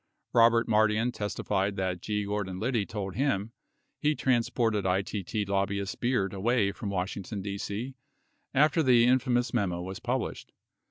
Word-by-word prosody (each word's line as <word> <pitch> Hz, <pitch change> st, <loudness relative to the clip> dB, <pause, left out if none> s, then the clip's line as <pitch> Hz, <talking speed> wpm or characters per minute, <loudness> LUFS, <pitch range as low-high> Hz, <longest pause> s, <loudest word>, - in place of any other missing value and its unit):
Robert 115 Hz, 0 st, +5 dB
Mardian 110 Hz, +2 st, +3 dB
testified 100 Hz, -2 st, -2 dB
that 95 Hz, -2 st, -2 dB
G. 105 Hz, -1 st, -2 dB
Gordon 100 Hz, -2 st, -3 dB
Liddy 115 Hz, -2 st, 0 dB
told 100 Hz, -3 st, -4 dB
him 115 Hz, -4 st, 0 dB, 0.5 s
he 150 Hz, 0 st, +2 dB
transported 115 Hz, -5 st, +1 dB
ITT 100 Hz, +2 st, -1 dB
lobbyist 100 Hz, 0 st, -1 dB
Beard 120 Hz, -6 st, 0 dB
away 100 Hz, +1 st, +1 dB
from 100 Hz, -, -6 dB
Wash 95 Hz, -1 st, -2 dB
ington, 100 Hz, 0 st, -5 dB
D.C., 100 Hz, +5 st, -4 dB, 0.6 s
after 150 Hz, +3 st, +3 dB
the 125 Hz, -5 st, +5 dB
infamous 125 Hz, -1 st, +2 dB
memo 95 Hz, -7 st, 0 dB
was 95 Hz, +1 st, -6 dB
published 125 Hz, 0 st, -3 dB
105 Hz, 140 wpm, -29 LUFS, 100-120 Hz, 0.6 s, Robert